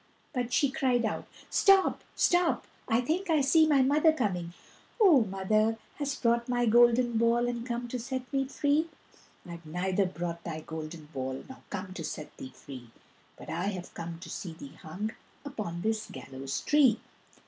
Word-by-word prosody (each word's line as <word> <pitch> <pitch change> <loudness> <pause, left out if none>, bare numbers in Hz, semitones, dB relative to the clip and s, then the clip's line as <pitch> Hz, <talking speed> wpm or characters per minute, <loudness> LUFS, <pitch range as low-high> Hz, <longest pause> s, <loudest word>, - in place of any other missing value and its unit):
But 245 -2 -2
she 280 +2 +3
cried 250 -3 +1
out: 220 - -3 0.2
"Stop, 390 -1 +4
stop, 350 -1 +2 0.2
I 230 0 +3
think 340 +9 -1
I 315 -3 +4
see 315 +4 +5
my 280 -3 +5
mother 300 +4 +4
coming! 180 - -2 0.4
O 355 - +7
mother, 215 +3 +1 0.2
hast 285 -1 -3
brought 235 +1 +2
my 245 -1 +2
golden 240 0 +4
ball 235 +1 +3
And 240 -1 -3
come 240 0 -3
to 250 - -3
set 260 +2 -3
me 270 0 +1
free?" 290 +4 +1 0.6
"I've 170 -1 -8
neither 180 +4 0
brought 170 -2 -5
thy 160 -2 -5
golden 160 0 -7
ball 130 0 -4
Nor 265 - -11
come 190 -1 -5
to 175 - -6
set 150 0 -6
thee 130 - -8
free, 130 -3 -10 0.5
But - - -9
I 170 +3 -2
have 185 -3 -4
come 170 0 -6
to - - -9
see 175 -4 -5
thee 140 -3 -11
hung 195 +7 -5 0.3
Upon 205 -11 -5
this 220 0 -1
gallows 135 0 -5
tree." 275 -7 +4
225 Hz, 170 wpm, -29 LUFS, 175-265 Hz, 0.6 s, O